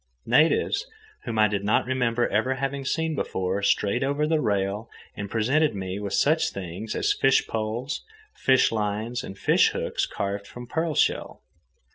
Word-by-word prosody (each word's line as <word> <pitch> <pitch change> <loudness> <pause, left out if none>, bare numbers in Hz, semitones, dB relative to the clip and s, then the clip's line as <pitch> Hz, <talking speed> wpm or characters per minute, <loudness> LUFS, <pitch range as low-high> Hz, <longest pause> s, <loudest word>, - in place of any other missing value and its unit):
Natives 165 - +3 0.4
whom 115 -2 -3
I 110 0 +5
did 100 -1 -2
not 105 - +2
remember 120 -2 +1
ever 120 +6 +1
having 135 +1 -3
seen 160 +3 0
before 95 -8 -2
strayed 100 +4 +1
over 140 +2 0
the 155 0 +1
rail 100 0 -1 0.3
and 100 -1 -5
presented 135 +7 +2
me 95 0 -4
with 100 -1 -4
such 160 +2 +3
things 95 +3 -6
as - - +2
fish 135 0 +3
poles, 115 +5 -3 0.3
fish 130 -1 +3
lines, 110 +3 -2
and 95 - -8
fish - - +3
hooks - - -1
carved 100 0 -4
from 120 0 -9
pearl 160 +4 -2
shell. - - 0
115 Hz, 160 wpm, -25 LUFS, 100-135 Hz, 0.4 s, I